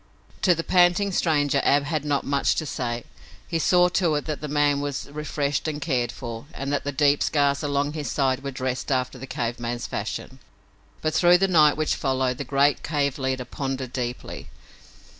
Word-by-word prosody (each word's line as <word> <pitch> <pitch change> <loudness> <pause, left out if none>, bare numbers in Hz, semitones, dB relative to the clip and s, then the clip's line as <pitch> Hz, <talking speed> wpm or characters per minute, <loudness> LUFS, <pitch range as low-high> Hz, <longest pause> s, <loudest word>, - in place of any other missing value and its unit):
To 180 -3 +4
the 165 - -3
panting 180 +3 +3
stranger 145 -6 +2
Ab 140 0 +4
had 150 0 -2
not 145 -2 0
much 140 0 +1
to 155 - -2
say. 120 -4 -3 0.4
He 165 - -1
saw 180 +2 +4
to 170 -3 +1
it 145 - -2
that 155 -2 -4
the 150 - -4
man 145 -1 +2
was 145 -1 -4
refreshed 145 -1 -2
and 150 -1 -3
cared 130 -6 0
for 115 +1 -7
and 140 +1 -3
that 145 - 0
the 145 - -1
deep 145 +1 +3
scars 140 -2 +2
along 145 0 -1
his 150 -2 -4
side 135 -1 0
were 140 - -3
dressed 130 +1 -3
after 130 0 -1
the 135 - -8
cave 120 -2 -3
man's 120 0 -3
fashion. 120 +5 -5 0.6
But 155 0 0
through 175 0 +6
the 195 +2 +2
night 155 -5 +5
which 155 -1 +1
followed 130 -2 -1
the - - -2
great 140 +2 +2
cave 145 -3 -1
leader 130 -1 -2
pondered 135 -1 -4
deeply. 125 -1 -5
140 Hz, 195 wpm, -24 LUFS, 130-150 Hz, 0.6 s, through